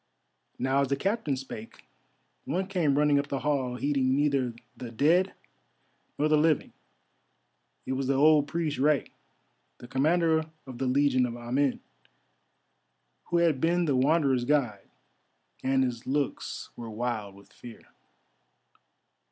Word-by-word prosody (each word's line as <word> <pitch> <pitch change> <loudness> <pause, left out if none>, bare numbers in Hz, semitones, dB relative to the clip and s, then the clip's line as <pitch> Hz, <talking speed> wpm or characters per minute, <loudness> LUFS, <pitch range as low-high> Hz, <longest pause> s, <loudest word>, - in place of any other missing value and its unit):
Now 135 +2 +1
as 140 - +1
the 140 - 0
Captain 170 - -1
spake, 120 -4 -9 0.6
one 190 +2 -1
came 170 -8 0
running 145 -1 +4
up 140 - -3
the 140 -1 -3
hall, 130 -3 -1
heeding 130 0 +1
neither 140 -4 +1 0.2
the 125 -2 -7
dead 165 - +2 0.8
nor 150 - +2
the 155 0 +3
living. 155 -1 +1 1.1
It 130 - -2
was 130 0 -2
the 135 - +2
old 150 +1 +5
priest 155 -3 -2
Rei, 145 0 +2 0.7
the 120 - -12
Commander 160 +4 +2 0.2
of 130 -3 -9
the 135 - -1
Legion 130 -1 +2
of 120 0 -6
Amen, 125 +3 -1 1.4
who 175 - 0
had 165 -6 +2
been 175 +1 +2
the 145 -4 +1
Wanderer's 135 -1 +2
guide, 125 -9 0 0.7
and 130 0 +2
his 125 -2 -4
looks 140 +1 -3
were 115 -1 -8
wild 110 -3 -4
with 100 - -18
fear. 120 -2 -12
140 Hz, 135 wpm, -28 LUFS, 125-150 Hz, 1.4 s, old